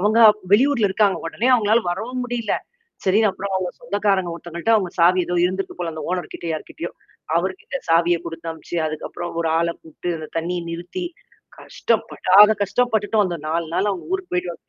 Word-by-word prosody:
அவங்க 215 +4 +3 0.3
வெளியூர்ல 245 -1 +4
இருக்காங்க 195 0 +2
உடனே 225 +9 -1
அவங்களால 225 0 +3
வரவும் 250 +7 -3
முடியில. 240 -3 -2 0.5
சரின்னு 210 +3 +4
அப்புறம் 195 +1 -5
அவவுங்க 185 -1 -1
சொந்தக்காரங்க 200 -6 0
ஒருத்தங்கள்ட்ட 170 +5 -2
அவுங்க 190 -5 -1
சாவி 180 +2 +5
ஏதோ 175 - -1
இருந்துக்கு 190 +2 -2
போல 170 -2 -3
அந்த 155 - -6
ஓனர்கிட்ட 180 -1 -4
யார்கிட்டயோ, 165 +2 -6 0.5
அவர்கிட்ட 190 +8 -4
சாவிய 170 +1 +4
குடுத்த 165 0 -6
அனுபிச்சு 160 +2 -7
அதுக்கப்புறம் 155 +2 -5
ஒரு 165 - 0
ஆள 170 0 +1
கூப்பட்டு 165 +2 -5
அந்த 155 - -8
தண்ணீய 175 +1 -2
நிறுத்தி 175 - -5 0.5
கஷ்ட்டப்படாத 225 -4 -2
படாத 210 +2 +9
கஷ்டோம் 245 +4 +1
பட்டுட்டோம் 215 0 +2
வந்த 175 -2 -2
4 165 +1 -1
நாள் 200 +3 +1
அவங்க 190 - -4
ஊருக்கு 380 -1 -2
போய்ட்டு 180 0 -1
வர்றதுக்குள்ள. 170 - -12
185 Hz, 170 wpm, -22 LUFS, 170-215 Hz, 0.5 s, படாத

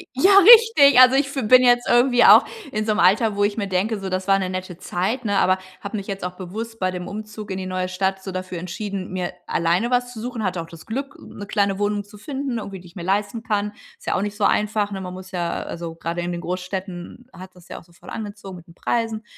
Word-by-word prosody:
Ja, 370 +10 +4
richtig, 435 - +8
also 255 +1 +7
ich 275 0 +2
f 260 -6 -2
bin 255 +1 +7
jetzt 245 0 +3
irgendwie 245 0 +4
auch - - +8 0.3
in 215 -3 -2
so 215 - +1
'nem 210 - 0
Alter, 205 +5 +3
wo 205 0 +1
ich 205 0 0
mir 205 -3 -2
denke: 195 +4 -1
„So, 195 -1 -5
das 185 +1 -3
war 195 0 +4
'ne 185 -1 -2
nette 185 -1 -5
Zeit“, 195 +9 -3
ne, 205 -2 +1
aber 185 0 +3 0.2
habe 200 +2 -5
mich 200 -2 -6
jetzt 195 -1 -5
auch 180 0 -3
bewusst 215 +5 -7
bei 185 -2 0
dem 180 -1 -6
Umzug 215 0 -8
in 190 - -3
die 190 - -4
neue 185 0 -3
Stadt 190 +1 -2
so 190 - -6
dafür 185 -1 -5
entschieden, 190 +2 -5
mir 185 -1 -3
alleine 175 +8 0
was 245 0 0
zu 225 - -8
suchen. 240 0 -5
Hatte 185 -2 -1
auch 165 - -7
das 165 -1 -13
Glück, 270 +5 -5
'ne 205 - -10
kleine 200 -1 0
Wohnung 205 0 -1
zu 205 +1 -15
finden, 265 +1 -4
irgendwie, 200 -3 -7
die 175 - -14
ich 170 - -21
mir 175 - -6
leisten 205 +4 -1
kann. 210 -2 -1 0.3
Ist - - -18
ja - - 0
auch - - 0
nicht 205 0 -4
so 210 - -1
einfach, 210 0 +1
ne? 195 - -4
Man 180 -1 -7
muss 185 0 -10
ja 175 -2 -3
also 170 -1 -6
gerade 170 +1 -4
in 175 0 -3
den 175 0 -5
Großstädten 185 +5 -6
hat 185 0 -12
das 180 0 -18
ja - - -7
auch - - -16
so 170 - -24
voll 170 - -14
angezogen 205 -3 -7
mit 170 - -16
den 170 - -17
Preisen. 225 +2 -2
200 Hz, 265 wpm, -22 LUFS, 185-225 Hz, 0.3 s, richtig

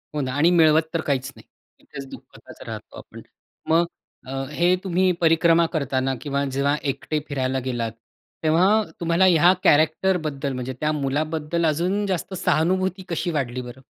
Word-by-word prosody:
हो 150 - 0
ना 130 -2 -2
आणि 150 +5 +3
मिळवत 160 -2 +5
तर 165 - 0
काहीच 135 -1 -1
नाही. - - -16 0.3
इथेच 140 - -10
दुःखताच - - -14
राहतो - - -8
आपण. - - -11 0.5
मग 165 +2 +4 0.4
अ, - - -7 0.2
हे 175 +4 +2
तुम्ही 185 0 +2
परिक्रमा 165 0 +4
करतांना 135 -3 -1
किंवा 140 -1 -2
जेव्हा 140 +2 +1 0.2
एकटे 150 +3 -4
फिरायला 130 -2 -1
गेलात, 120 -3 -2 0.5
तेव्हा 160 +4 +4 0.3
तुम्हाला 170 +2 +2
ह्या 175 -1 +6
कॅरेक्टरबद्दल 155 -2 +2
म्हणजे 130 0 -4
त्या 155 0 0
मुलाबद्दल 155 +3 -1
अजून 180 +7 0
जास्त 190 0 -3
सहानुभूती 185 +3 0
कशी 170 +1 -2
वाढली 130 -5 -2
बरं? 125 +1 -10
155 Hz, 150 wpm, -23 LUFS, 140-170 Hz, 0.5 s, ह्या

